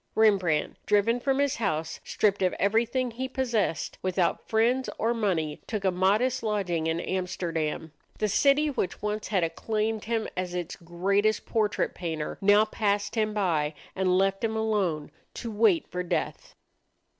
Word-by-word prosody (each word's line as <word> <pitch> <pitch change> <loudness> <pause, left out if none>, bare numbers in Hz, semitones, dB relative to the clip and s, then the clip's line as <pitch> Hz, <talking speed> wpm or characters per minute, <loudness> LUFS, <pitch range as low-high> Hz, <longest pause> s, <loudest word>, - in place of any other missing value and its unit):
Rembrandt, 190 -8 +2
driven 210 +4 +3
from 270 +2 0
his 280 -1 +1
house, 165 -7 -2
stripped 205 -2 +1
of 185 -1 +2
everything 235 +5 +1
he 255 +3 -4
possessed, 230 - -1
without 185 -1 0
friends 240 +4 +2
or 230 +2 +1
money, 175 -10 -1
took 210 -3 -3
a 190 - +4
modest 210 +8 +2
lodging 190 -7 -1
in 160 +1 0
Amsterdam. 170 -4 -2 0.3
The 215 - +1
city 280 +8 +3
which 205 -8 -3
once 210 0 -2
had 190 -5 +1
acclaimed 215 +6 -1
him 225 0 -1
as 180 -1 -3
its 175 -2 -4
greatest 195 +5 0
portrait 215 -2 0
painter 160 -3 -4
now 205 +2 +5
passed 205 -2 -1
him 215 -2 0
by 160 -7 0 0.2
and 185 -1 +2
left 195 +1 +1
him 220 -1 0
alone 195 -9 0 0.2
to 230 - -5
wait 210 -5 +3
for 180 - -2
death. 180 - -3
205 Hz, 155 wpm, -27 LUFS, 180-220 Hz, 0.3 s, now